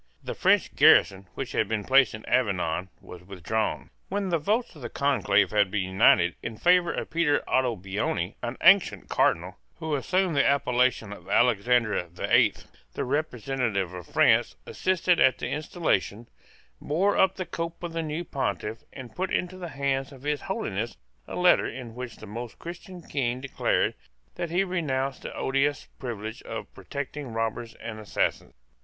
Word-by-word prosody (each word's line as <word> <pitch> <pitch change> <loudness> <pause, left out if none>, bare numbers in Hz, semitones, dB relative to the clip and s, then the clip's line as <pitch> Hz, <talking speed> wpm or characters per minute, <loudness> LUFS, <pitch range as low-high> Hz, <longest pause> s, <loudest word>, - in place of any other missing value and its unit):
The - - -4
French - - +2
garrison 95 0 +5
which 135 - -4
had 110 - +1
been 105 -1 -2
placed 130 -2 +4
in 110 - -11
Avignon 95 -6 0
was 90 - -11
withdrawn. 100 +4 -3 0.2
When 195 0 -1
the 170 -2 +1
votes 215 +7 -1
of 150 - -13
the 120 - -5
Conclave 105 -9 +2
had 105 -2 +3
been 100 -1 -1
united 95 -2 +4
in 115 -2 -6
favour 180 +3 +4
of - - -5
Peter 160 -3 +2
Ottobuoni, 100 -6 -1
an 120 +1 -4
ancient 190 +1 +5
Cardinal 90 +4 +1 0.2
who 160 -2 -4
assumed 180 +4 +1
the 140 - +4
appellation 125 -5 +1
of - - -13
Alexander 115 -4 +2
the 85 - 0
Eighth, - - +3 0.3
the - - -2
representative 125 - -1
of 90 -2 -8
France - - +3
assisted 185 -1 +1
at 130 - +5
the - - -4
installation, 130 - -1 0.5
bore 185 +8 +1
up 190 0 +3
the 185 - -4
cope 165 0 -5
of 170 -1 -4
the 165 - -1
new 155 +2 -3
Pontiff, 115 -6 -3
and 130 -3 -10
put 185 +1 -2
into 180 0 -1
the 175 -2 -6
hands 135 -2 -1
of 135 -1 -14
His 150 0 -1
Holiness 115 - -3 0.3
a - - -6
letter 180 0 +4
in 120 -2 -7
which 125 0 -7
the - - -11
most 115 +3 -7
Christian 175 +1 -9
King 125 -4 -2
declared 135 0 0 0.4
that 170 - -4
he 175 +4 +2
renounced 140 -8 -2
the - - -7
odious 135 +2 0
privilege 110 -3 -5
of - - -7
protecting 140 -2 -6
robbers 115 +1 -3
and 110 -1 -7
assassins. 105 - -2
130 Hz, 165 wpm, -27 LUFS, 110-165 Hz, 0.5 s, garrison